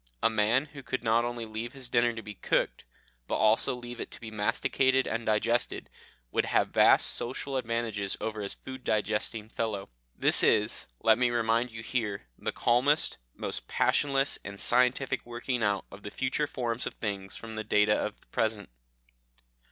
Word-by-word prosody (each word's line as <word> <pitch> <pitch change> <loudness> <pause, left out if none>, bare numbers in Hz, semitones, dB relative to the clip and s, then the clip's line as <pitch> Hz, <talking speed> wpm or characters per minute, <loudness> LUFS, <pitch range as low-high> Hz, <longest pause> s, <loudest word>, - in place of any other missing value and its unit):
A 115 - +5
man 110 +5 +3
who 140 - -8
could 125 - -3
not 115 +1 +3
only 120 -1 -3
leave 110 +2 -5
his 135 -2 -3
dinner 120 0 +3
to 115 -1 -7
be 105 - -7
cooked, 95 - -1 0.4
but - - -1
also 110 +3 +3
leave 120 -1 -8
it - - -5
to - - -11
be 110 -1 -8
masticated 130 +5 +2
and 115 0 -3
digested, 110 +3 0 0.4
would - - +1
have - - +2
vast - - +5
social 135 +3 -4
advantages 115 -5 -2
over 110 -1 -3
his 100 - -3
food 130 -1 -9
digesting 110 0 -1
fellow. 110 -3 -3 0.3
This - - +2
is, 105 0 +2
let 110 +1 +5
me 125 -1 +4
remind 115 +1 +1
you 115 -1 -8
here, 110 -5 -2
the - - -3
calmest, 130 +6 +2 0.2
most - - -4
passionless, 140 -1 +1
and 100 0 -8
scientific 125 +2 +3
working 120 +1 -3
out 100 -2 +1
of 100 - -11
the 105 - -6
future 130 +6 -1
forms 120 -3 -2
of - - -6
things 100 -3 -4
from 115 -1 -8
the 110 0 -4
data 105 0 +3
of 105 0 -2
the - - -25
present. 110 - -1
115 Hz, 175 wpm, -29 LUFS, 105-125 Hz, 0.4 s, A